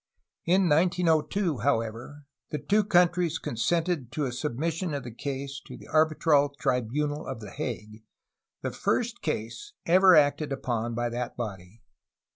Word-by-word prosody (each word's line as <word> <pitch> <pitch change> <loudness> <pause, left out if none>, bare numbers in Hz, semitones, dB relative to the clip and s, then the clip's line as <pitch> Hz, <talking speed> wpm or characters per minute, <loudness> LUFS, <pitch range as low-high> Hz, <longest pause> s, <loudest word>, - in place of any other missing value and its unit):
In 185 +3 +4
1902, 170 - +2
however, 120 +3 -2 0.2
the 150 - -2
two 200 +10 +2
countries 175 -3 +3
consented 160 +1 -1
to 150 - -1
a 130 - -2
submission 155 +6 -2
of 140 - -4
the 120 - -7
case 140 +2 -5
to - - -9
the - - -14
arbitral 155 -2 +3
tribunal 145 +5 -1
at - - -5
the 105 -2 -9
Hague, 110 -6 -6 0.3
— - - -61
the - - -2
first 240 0 -1
case 150 - -4
ever 185 +1 +6
acted 145 0 +3
upon 120 -3 -2
by 120 0 -1
that 120 +1 -4
body. 100 -2 -7
145 Hz, 145 wpm, -27 LUFS, 120-170 Hz, 0.3 s, ever